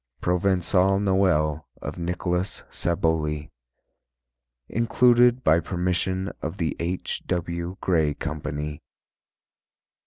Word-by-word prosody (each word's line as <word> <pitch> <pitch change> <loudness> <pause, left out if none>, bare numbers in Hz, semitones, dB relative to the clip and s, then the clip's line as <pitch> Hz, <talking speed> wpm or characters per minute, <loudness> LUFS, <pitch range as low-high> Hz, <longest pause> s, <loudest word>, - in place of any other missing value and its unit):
Provençal 95 +1 +2
Noël 90 -7 +2 0.2
of - - -6
Nicholas 90 +2 -1
Saboly 80 -3 -1 1.2
_Included 120 +2 +4
by 80 +2 +5
permission 90 +2 -1
of 80 +5 -4
The 80 -6 -1
H. 90 +2 -3
W. 85 0 -3
Gray 80 -5 +2
Company. 75 -1 -4
90 Hz, 85 wpm, -25 LUFS, 80-95 Hz, 1.2 s, by